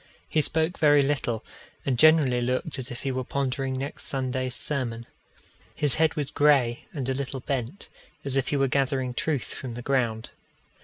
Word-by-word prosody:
He 155 - +1
spoke 160 +3 +1
very 145 -2 +5
little, 135 -5 -2 0.4
and 135 - +1
generally 145 -3 +4
looked 130 +4 -2
as 130 0 -3
if 120 - -8
he 135 - -1
were 130 0 -3
pondering 135 0 -2
next 140 +3 -6
Sunday's 130 -1 -2
sermon. 120 -5 0 0.7
His 150 -3 +8
head 160 0 +2
was 145 -2 -3
grey, 140 -6 +2
and 135 -5 -5
a 135 - 0
little 135 -1 -4
bent, 135 - -4 0.4
as 135 -1 -2
if 135 -2 0
he 145 - 0
were 135 0 +2
gathering 130 -1 -1
truth 145 0 -2
from 125 -3 -7
the 120 - -7
ground. 120 -5 -1
135 Hz, 175 wpm, -26 LUFS, 125-145 Hz, 0.7 s, His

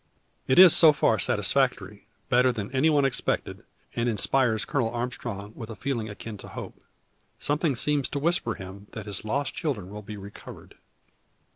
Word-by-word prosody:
It 130 - +2
is 185 -2 +9
so 160 -3 +7
far - - +2
satisfactory, - - +1 0.2
better 125 +1 +3
than 110 -4 -6
any 135 +4 +2
one 145 -3 +3
expected; 135 - -1 0.3
and 120 +1 0
inspires 110 0 +2
Colonel 125 -3 -1
Armstrong 120 -3 -5
with 115 -3 -8
a 115 - -7
feeling 120 -5 -3
akin 105 0 -8
to - - -10
hope. - - -9 0.6
Something 145 0 0
seems 145 +2 0
to - - -4
whisper 145 - +1
him 95 +2 -10
his 105 -2 -3
lost 135 +5 -2
children 110 - -4
will 105 +1 -7
be 105 0 -9
recovered. 100 +1 -12
120 Hz, 160 wpm, -26 LUFS, 105-140 Hz, 0.6 s, is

